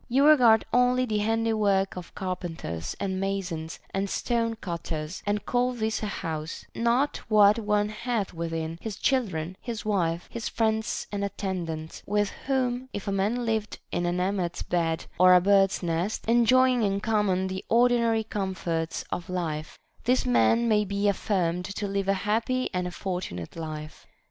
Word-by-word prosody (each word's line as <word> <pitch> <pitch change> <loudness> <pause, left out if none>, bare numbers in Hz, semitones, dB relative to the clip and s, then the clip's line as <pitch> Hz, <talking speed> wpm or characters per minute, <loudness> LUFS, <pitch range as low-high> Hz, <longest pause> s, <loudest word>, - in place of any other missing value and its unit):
You 270 +4 +4
regard 245 -8 +6
only 250 +1 +4
the 215 -3 -1
handiwork 215 -3 +1
of 180 -2 -9
carpenters 175 - -4
and 190 -1 -2
masons 190 -5 -3 0.2
and 195 +1 -1
stone 230 0 0
cutters, 170 -4 -5
and 205 0 0
call 250 +1 +1
this 220 -2 -1
a 215 - -2
house; 160 -4 -5
not 240 +5 +1
what 210 0 +6
one 210 -1 +1
hath 215 -2 -2
within, 165 -1 -4
his 220 -3 -4
children, 185 - 0
his 230 -2 -5
wife, 175 -5 0
his 230 -1 -4
friends 220 -1 0
and 200 -1 -2
attendants, 180 -5 -4
with 205 0 +1 0.2
whom 260 -1 0
if 205 - -5
a - - 0
man 210 +5 0
lived 220 -2 -1
in 175 - 0
an 175 +1 0
emmet's 180 -2 -1
bed 165 -2 -1
or 185 0 +8
a - - +8
bird's 195 +1 +3
nest, 170 +5 -1
enjoying 250 +2 +4
in 200 -2 +1
common 210 -3 +1
the 190 0 -4
ordinary 235 -1 +3
comforts 185 -6 -3
of 175 - -4
life, 165 -4 -3 0.3
this 250 +1 +2
man 125 - +3
may 210 -2 +3
be 200 +1 -1
affirmed 180 -3 0
to 205 +2 -4
live 195 0 -1
a 195 - +4
happy 230 +4 0
and 180 -1 -1
a - - -5
fortunate 175 - -5
life. 155 -2 -7
200 Hz, 160 wpm, -27 LUFS, 175-225 Hz, 0.3 s, or